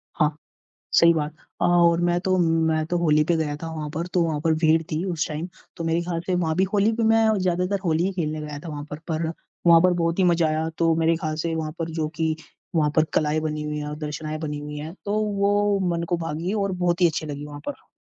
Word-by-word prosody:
हाँ, 150 Hz, -2 st, +1 dB, 0.6 s
सही 170 Hz, 0 st, +6 dB
बात। 150 Hz, 0 st, -2 dB, 0.3 s
अ, -, -, +2 dB
और 170 Hz, -1 st, +4 dB
मैं 175 Hz, 0 st, +2 dB
तो 185 Hz, 0 st, +1 dB
मैं 160 Hz, -2 st, +2 dB
तो 175 Hz, +2 st, -1 dB
होली 155 Hz, -2 st, +3 dB
पे 170 Hz, +1 st, +2 dB
गया 150 Hz, -2 st, -1 dB
था 165 Hz, -, -4 dB
वहाँ 150 Hz, -1 st, -4 dB
पर 165 Hz, +3 st, -2 dB
तो 180 Hz, -, +4 dB
वहाँ 155 Hz, -3 st, -1 dB
पर 160 Hz, -1 st, +3 dB
भीड़ 160 Hz, +1 st, +4 dB
थी 155 Hz, -, 0 dB
उस 165 Hz, -, -1 dB
टाइम 155 Hz, +4 st, -4 dB, 0.3 s
तो 165 Hz, -, -4 dB
मेरे 165 Hz, +1 st, +1 dB
ख्याल 170 Hz, -1 st, -3 dB
से 185 Hz, -, +1 dB
वहाँ 165 Hz, -3 st, 0 dB
भी 190 Hz, -, +4 dB
होली 210 Hz, +2 st, +3 dB
पे 230 Hz, -, 0 dB
मैं 225 Hz, 0 st, +4 dB
ज़्यादातर 185 Hz, +2 st, 0 dB
होली 165 Hz, +1 st, +2 dB
ही 195 Hz, -, 0 dB
खेलने 155 Hz, -4 st, -2 dB
गया 150 Hz, -1 st, -6 dB
था 165 Hz, +3 st, -9 dB
वहाँ 145 Hz, -1 st, -5 dB
पर 150 Hz, -, -5 dB
पर 160 Hz, 0 st, -1 dB, 0.4 s
वहाँ 170 Hz, -1 st, +8 dB
पर 180 Hz, +1 st, +4 dB
बहुत 170 Hz, 0 st, 0 dB
ही 185 Hz, -, +4 dB
मज़ा 170 Hz, -2 st, +3 dB
आया। 155 Hz, +1 st, 0 dB
तो 165 Hz, -1 st, +3 dB
मेरे 165 Hz, 0 st, +2 dB
ख्याल 155 Hz, -1 st, -3 dB
से 165 Hz, -1 st, -1 dB
वहाँ 155 Hz, -1 st, -3 dB
पर 165 Hz, 0 st, -3 dB
जो 155 Hz, -, 0 dB
कि 160 Hz, -1 st, +1 dB, 0.4 s
वहाँ 150 Hz, -2 st, +3 dB
पर 155 Hz, -, +5 dB
कलाएँ 155 Hz, 0 st, +2 dB
बनी 155 Hz, -1 st, -3 dB
हुई 150 Hz, 0 st, -3 dB
है 150 Hz, -, -4 dB
और 150 Hz, -, -5 dB
दर्शनाएँ 155 Hz, 0 st, -4 dB
बनी 150 Hz, -2 st, -4 dB
हुई 150 Hz, 0 st, -6 dB
है, 155 Hz, +3 st, -6 dB
तो 210 Hz, +1 st, 0 dB
वो 205 Hz, -1 st, +2 dB, 0.2 s
मन 170 Hz, -, -2 dB
को 175 Hz, -, +1 dB
भा 165 Hz, -2 st, -4 dB
गईं 170 Hz, +6 st, -2 dB
और 200 Hz, -2 st, 0 dB
बहुत 180 Hz, -1 st, 0 dB
ही 175 Hz, -, +7 dB
अच्छी 160 Hz, -1 st, -2 dB
लगी 145 Hz, -1 st, -5 dB
वहाँ 145 Hz, 0 st, -9 dB
पर। 290 Hz, -, -8 dB
165 Hz, 260 wpm, -24 LUFS, 155-175 Hz, 0.6 s, वहाँ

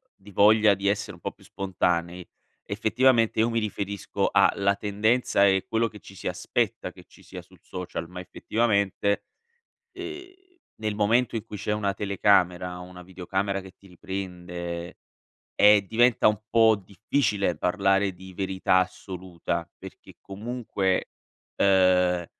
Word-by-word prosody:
di 95 Hz, -, -17 dB
voglia 105 Hz, +1 st, +5 dB
di 100 Hz, +1 st, -3 dB
essere 100 Hz, 0 st, -1 dB
un -, -, -15 dB
po' -, -, -4 dB
più -, -, -23 dB
spontanei, 90 Hz, -2 st, -2 dB, 0.4 s
effettivamente, 115 Hz, +3 st, +2 dB
io 115 Hz, +2 st, +3 dB
mi 115 Hz, 0 st, 0 dB
riferisco 100 Hz, -2 st, -2 dB
a -, -, +4 dB
la 100 Hz, 0 st, +2 dB
tendenza 105 Hz, +2 st, +1 dB
e 95 Hz, -1 st, +2 dB
quello 115 Hz, +1 st, +1 dB
che 105 Hz, -1 st, -12 dB
ci -, -, -14 dB
si 95 Hz, -, -7 dB
aspetta -, -, -2 dB
che -, -, -16 dB
ci -, -, -20 dB
sia -, -, -9 dB
sul -, -, -21 dB
social, 90 Hz, -2 st, -6 dB
ma 90 Hz, +1 st, -9 dB
effettivamente, 100 Hz, +1 st, 0 dB, 0.7 s
ehm, 370 Hz, 0 st, -8 dB, 0.4 s
nel 110 Hz, -1 st, -3 dB
momento 115 Hz, +3 st, +1 dB
in 110 Hz, -, -2 dB
cui 105 Hz, -2 st, -8 dB
c'è 105 Hz, +1 st, -3 dB
una 100 Hz, -2 st, -1 dB
telecamera, 90 Hz, -3 st, +1 dB
una 90 Hz, 0 st, -11 dB
videocamera 95 Hz, +2 st, -3 dB
che 95 Hz, -1 st, -13 dB
ti 100 Hz, -, -19 dB
riprende, 90 Hz, -2 st, -6 dB, 0.6 s
ehm, 105 Hz, 0 st, +7 dB
diventa 120 Hz, +2 st, +3 dB
un 105 Hz, -1 st, +1 dB
po' 115 Hz, -1 st, +5 dB
difficile 100 Hz, -, -1 dB
parlare 95 Hz, +2 st, +1 dB
di 95 Hz, +1 st, -12 dB
verità 95 Hz, -1 st, +1 dB
assoluta 90 Hz, -2 st, -4 dB
perché -, -, -13 dB
comunque, 100 Hz, -2 st, -2 dB, 0.5 s
uhm, 90 Hz, -2 st, +3 dB
100 Hz, 140 wpm, -26 LUFS, 90-105 Hz, 0.7 s, ehm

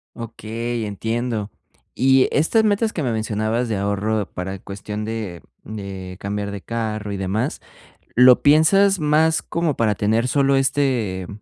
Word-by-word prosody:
Okey, 115 Hz, 0 st, -4 dB
entiendo. 110 Hz, +1 st, -3 dB, 0.5 s
Y 135 Hz, 0 st, +4 dB
estas 190 Hz, +9 st, +2 dB
metas 215 Hz, +1 st, +1 dB
que 160 Hz, -, -3 dB
me 125 Hz, -5 st, 0 dB
mencionabas 110 Hz, +2 st, -1 dB
de 110 Hz, -3 st, -1 dB
ahorro 100 Hz, +1 st, -1 dB
para 95 Hz, +1 st, -5 dB
cuestión 105 Hz, +2 st, -6 dB
de 110 Hz, -6 st, -5 dB, 0.2 s
de 95 Hz, -3 st, -7 dB
cambiar 100 Hz, 0 st, -3 dB
de 100 Hz, -1 st, -6 dB
carro 110 Hz, -2 st, -4 dB
y -, -, -3 dB
demás, 100 Hz, +8 st, -2 dB, 0.5 s
¿lo 125 Hz, 0 st, +7 dB
piensas 185 Hz, +6 st, +4 dB
más 155 Hz, +2 st, +2 dB
como 170 Hz, -4 st, -1 dB
para 110 Hz, -2 st, +2 dB
tener 110 Hz, +5 st, +1 dB
solo 140 Hz, +1 st, +2 dB
este, 130 Hz, -9 st, 0 dB
115 Hz, 140 wpm, -21 LUFS, 105-135 Hz, 0.5 s, lo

